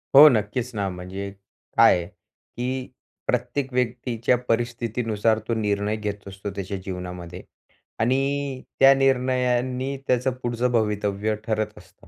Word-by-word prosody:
हो 145 +3 +12
नक्कीच 115 +1 0
ना, 100 -2 0
म्हणजे 95 +2 -6 0.5
काय - - +8
आहे, 85 - -4
की 125 +5 -6 0.4
प्रत्येक 125 +2 -1
व्यक्तीच्या 125 -1 +1
परिस्थितीनुसार 115 -2 0
तो 115 - +1
निर्णय 105 -1 0
घेत 105 -2 -5
असतो 100 +1 -6
त्याच्या 100 0 -4
जीवनामध्ये. 90 -1 -6 0.6
आणि 135 +2 0 0.2
त्या 135 0 +9
निर्णयांनी 130 0 +1
त्याचं 125 +1 +2
पुढचं 120 +1 0
भवितव्य 105 -2 0
ठरत 110 -1 -1
असतं. - - -18
115 Hz, 120 wpm, -24 LUFS, 100-125 Hz, 0.6 s, हो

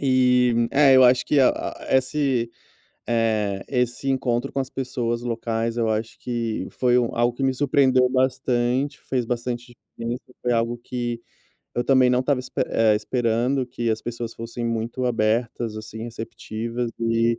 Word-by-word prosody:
E, 125 -2 +3 0.2
é, 140 -1 +6
eu 130 - +7
acho 125 0 +5
que 150 - +3
a 130 - +6
a 130 - -2
esse, 130 -3 0 0.6
eh, 110 -4 0
esse 125 +1 -1
encontro 130 -1 0
com 140 - -1
as 130 - -6
pessoas 120 -3 -2
locais, 115 -1 -2
eu 115 -2 +1
acho 110 +1 -2
que 115 -5 -3
foi 125 -1 +2
um 120 - -1
algo 120 +1 +1
que 135 - -3
me 130 -1 +2
surpreendeu 130 -2 +3
bastante, 130 +1 0
fez 125 -3 -2
bastante 120 +1 -4 0.2
diferença, 115 +1 -4 0.2
foi 120 -1 +1
algo 115 +1 0
que 120 -1 -4 0.6
eu 120 - +1
também 130 -2 +4
não 125 0 +3
estava 135 0 +1
esp 125 - -10
eh, 110 -1 +3
esperando, 120 +4 0
que 120 -1 -3
as 110 0 -2
pessoas 120 -1 -5
fossem 115 +1 -6
muito 115 +2 -2
abertas 115 0 0
assim, 110 0 -8
receptivas, 115 +1 -5
e 115 0 +1
120 Hz, 160 wpm, -23 LUFS, 115-130 Hz, 0.6 s, eu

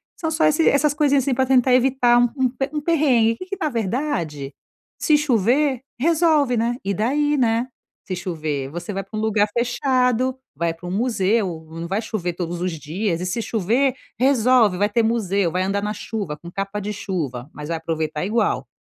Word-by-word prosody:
são 320 - -3
só 320 0 +1
e - - +6 0.2
essas 285 +1 +2
coisinhas, 285 -2 +2
assim, 270 - 0
pra 260 +1 +1
tentar 255 -1 +4
evitar 250 -1 +4
um 245 - +4 0.2
um 245 - +1 0.3
um 295 - -1
perrengue. 270 -9 +3
Que 370 - -8
que, 395 +1 -5
na 310 - 0
verdade, 195 - -2 0.5
se 305 -1 +4
chover, 260 0 +2 0.2
resolve, 310 -3 +3
né? 235 +2 0
E 200 - 0
daí, 290 +8 +1
né, 235 0 +1 0.4
se 185 - -3
chover, 155 -6 -3
você 175 +6 -6
vai 195 0 -3
pra 205 +3 -11
um - - -1
lugar 215 -1 +2
fechado, 250 +1 +1 0.2
vai 165 +2 -1
pra 175 +2 -10
um - - -4
museu. 195 -6 0
Não 165 +1 -6
vai 200 +5 -1
chover 180 -6 -3
todos 175 0 -4
os 180 0 -1
dias 170 +4 -2
e, - - -2
se 185 +6 -2
chover, 235 +6 +1 0.2
resolve. 250 -6 +4
Vai 205 +2 +2
ter 230 +2 +2
museu, 200 -6 +1
vai 185 - 0
andar 195 +1 -1
na 210 0 -2
chuva, 205 -7 -5
com 170 - -11
capa 195 +2 -3
de 205 +1 -4
chuva, 155 - -4
mas 150 +1 -8
vai 165 - -1
aproveitar 160 -1 -3
igual. 215 +2 0
220 Hz, 195 wpm, -22 LUFS, 180-255 Hz, 0.5 s, e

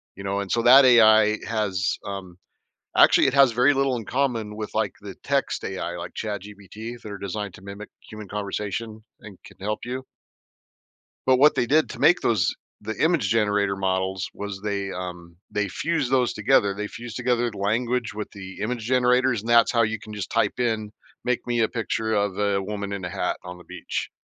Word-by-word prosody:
you 100 - -9
know? 100 0 -1
And 100 -2 -4
so, 115 - +1
that 130 +4 +8
AI 110 -3 +6
has, 100 -4 -1
um 95 -3 -7 0.6
actually - - +6
it 135 - 0
has 135 -3 +6
very 125 +5 +4
little 135 -1 +1
in 115 - -4
common 115 -5 -1
with, 105 -1 -6
like, - - 0
the - - -8
text - - -1
AI 90 -2 -4
like 85 - -7
ChatGPT 105 +2 -7
that 105 - -8
are 100 - -6
designed 100 0 -4
to - - -15
mimic 100 +2 -9 0.2
human 110 -1 -9
conversation 105 +2 -4 0.2
and 105 -3 -12
can - - -15
help 105 +3 -3
you. 130 +2 -4 1.2
But 130 -1 +5
what 145 +3 +5
they - - +1
did 150 +5 +3
to - - -8
make 175 - +5
those 105 -8 +1 0.3
the 110 - -5
image 160 - +2
generator 105 -2 +1
models 95 0 -1
was 100 -1 -6
they, 100 -2 -2
um 90 -2 -7
they 105 -1 -1
fused 150 -5 -1
those 125 -2 +2
together. 105 -2 +3
They 105 +1 -4
fused 120 +1 -9
together 120 -1 +1
the 105 - -11
language 115 +3 -1
with 105 0 -5
the 95 -2 -10
image 115 +2 -3
generators, 125 0 +2
and 115 - -7
that's 120 0 +5
how 115 -2 +3
you 110 0 -1
can 105 +1 -10
just 105 -2 -5
type 115 +2 0
in, 110 -3 -1 0.3
"Make 125 0 -1
me 120 -1 +1
a 110 - +2
picture 110 -1 -2
of 100 -2 0
a 100 -1 +1
woman 100 0 -5
in 100 -2 -4
a - - -4
hat 95 -1 -2
on 90 0 -8
the 90 - -14
beach," - - -5
105 Hz, 200 wpm, -24 LUFS, 100-120 Hz, 1.2 s, that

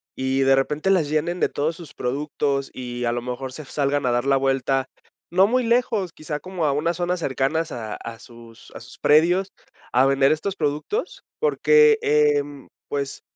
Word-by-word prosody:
y 130 0 -1
de 135 0 +5
repente 150 +6 0
las 180 -6 +3
llenen 165 +4 -1
de - - +2
todos 155 +3 -2
sus 165 -4 -12
productos 140 +1 -2
y 120 -1 -5
a 120 - +1
lo 120 0 -2
mejor 125 +2 -5
se 155 - -8
salgan 145 0 -1
a - - +2
dar 120 +1 0
la 135 0 +3
vuelta, 135 0 0 0.4
no 185 +2 +4
muy 250 +4 +1
lejos, 230 -6 +1
quizá, 155 -1 -5
como 185 -2 -4
a 145 - +2
unas 160 +4 -1
zonas 180 0 -1
cercanas 155 +3 -1
a 110 -3 -6 0.2
sus 115 -1 -15
a - - -7
sus 120 +3 -14
predios 175 +6 +3 0.4
a 130 +2 +4
vender 135 +1 +3
estos 185 +5 -1
productos? 155 - -3 0.2
Porque, 455 -1 +4
em, 145 -2 +1 0.2
pues, 140 -1 -4
145 Hz, 180 wpm, -23 LUFS, 135-175 Hz, 0.4 s, de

